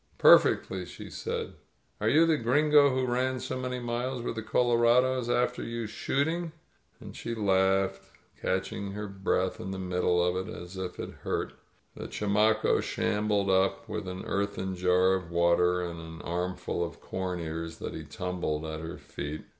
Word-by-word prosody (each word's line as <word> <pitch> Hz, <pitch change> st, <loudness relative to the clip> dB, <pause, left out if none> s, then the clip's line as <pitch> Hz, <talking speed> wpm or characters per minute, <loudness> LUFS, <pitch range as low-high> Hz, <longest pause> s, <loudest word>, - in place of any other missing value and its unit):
"Perfectly," 95 Hz, -1 st, +5 dB
she -, -, -10 dB
said. -, -, -4 dB, 0.5 s
"Are -, -, +2 dB
you 160 Hz, +3 st, +6 dB
the 165 Hz, -1 st, +3 dB
Gringo 145 Hz, +3 st, +4 dB
who 130 Hz, -1 st, 0 dB
ran 130 Hz, +1 st, 0 dB
so 130 Hz, -, -4 dB
many 125 Hz, 0 st, -3 dB
miles 120 Hz, +1 st, -2 dB
with -, -, -2 dB
the 110 Hz, -, -4 dB
colorados 120 Hz, +2 st, +3 dB
after 125 Hz, 0 st, +1 dB
you 115 Hz, 0 st, -4 dB
shooting?" 155 Hz, +9 st, -1 dB, 0.5 s
And -, -, -10 dB
she 115 Hz, 0 st, -4 dB
laughed 95 Hz, -2 st, +2 dB, 0.2 s
— -, -, -31 dB
catching 100 Hz, +1 st, -2 dB
her 105 Hz, 0 st, -4 dB
breath 95 Hz, -1 st, -1 dB
in 95 Hz, -, -5 dB
the 95 Hz, -, -4 dB
middle 90 Hz, -1 st, +1 dB
of 90 Hz, +2 st, 0 dB
it -, -, -6 dB
as 90 Hz, -3 st, -8 dB
if 95 Hz, -1 st, -5 dB
it -, -, -5 dB
hurt. -, -, -2 dB, 0.4 s
The -, -, -6 dB
chamaco 105 Hz, +2 st, +2 dB
shambled 105 Hz, -2 st, 0 dB
up 95 Hz, +1 st, +2 dB
with 105 Hz, -3 st, -4 dB
an 90 Hz, 0 st, -5 dB
earthen 100 Hz, -1 st, -2 dB
jar 90 Hz, +1 st, +3 dB
of 90 Hz, -3 st, -2 dB
water 85 Hz, +1 st, +3 dB
and 85 Hz, -1 st, -5 dB
an 80 Hz, 0 st, -9 dB
armful 90 Hz, 0 st, -2 dB
of 85 Hz, -, -6 dB
corn 90 Hz, -1 st, -4 dB
ears 80 Hz, 0 st, -5 dB
that -, -, -5 dB
he -, -, -6 dB
tumbled 90 Hz, -4 st, -3 dB
at 80 Hz, 0 st, -4 dB
her 80 Hz, +1 st, -6 dB
feet. 75 Hz, +2 st, -6 dB
95 Hz, 170 wpm, -29 LUFS, 90-120 Hz, 0.5 s, you